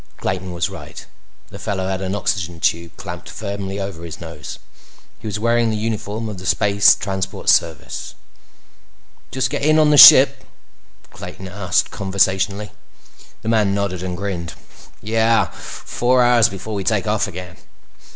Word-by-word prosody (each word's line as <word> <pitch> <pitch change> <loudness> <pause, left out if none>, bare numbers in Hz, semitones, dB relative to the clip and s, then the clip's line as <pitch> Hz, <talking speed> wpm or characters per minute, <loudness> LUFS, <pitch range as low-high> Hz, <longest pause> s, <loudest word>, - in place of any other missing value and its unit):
Clayton 95 0 -3
was 85 -2 -1
right. - - -10 0.4
The - - -11
fellow 95 -2 -3
had 95 0 -3
an 95 +1 -3
oxygen 90 -4 -2
tube 85 0 -1
clamped - - -8
firmly 100 -1 -5
over 95 -4 -6
his 85 -2 -8
nose. 80 -3 -8 0.6
He - - -8
was 105 - -3
wearing 115 +1 +1
the 110 - -2
uniform 110 0 -3
of 105 -3 -7
the 90 - -7
Space 100 0 +4
Transport 95 0 -3
Service. 80 -3 0 1.1
"Just 130 -1 -1
get - - -2
in 155 +2 +3
on 155 -1 +4
the 150 - +4
ship?" - - +9 0.7
Clayton 95 +1 -9
asked 95 -1 -1
conversationally. 100 +1 0 0.7
The 110 - -3
man 105 -3 +2
nodded 100 -3 -2
and 90 -1 -4
grinned. 90 -4 -5 0.5
"Yeah. 115 +1 +2
Four 125 +1 -1
hours 120 -2 +4
before 100 +3 -7
we 100 -2 -3
take - - 0
off - - 0
again." 90 0 -9
100 Hz, 150 wpm, -19 LUFS, 90-110 Hz, 1.1 s, ship